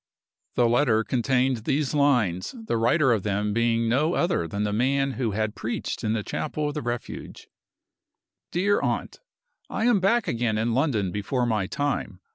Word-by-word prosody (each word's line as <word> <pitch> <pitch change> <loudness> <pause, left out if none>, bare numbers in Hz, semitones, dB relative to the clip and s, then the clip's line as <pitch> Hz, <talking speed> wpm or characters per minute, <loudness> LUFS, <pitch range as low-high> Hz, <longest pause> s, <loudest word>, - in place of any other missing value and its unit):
The 120 - +4
letter 115 -2 +3
contained 125 +3 +1
these 135 +6 -1
lines, 125 - +1
the 225 - -3
writer 125 +5 +3
of 110 -4 +2
them 105 +1 -1
being 115 0 +1
no 150 +9 +2
other 175 - +1
than 100 +5 -3
the 105 -1 -1
man 135 +4 +1
who 125 -3 -2
had 110 0 -1
preached 115 +2 -4
in 110 -1 +1
the 110 -2 -1
chapel 150 +4 -2
of - - -5
the 150 - -3
Refuge: 120 0 -6 1.0
"DEAR 200 +4 +2
AUNT - - -2 0.5
I 220 - -1
am 240 -4 +4
back 225 +5 +2
again 115 -2 0
in 115 +1 0
London 115 - +1
before 120 +6 -1
my 110 -5 0
time. 140 -9 -2
120 Hz, 170 wpm, -25 LUFS, 110-145 Hz, 1.0 s, The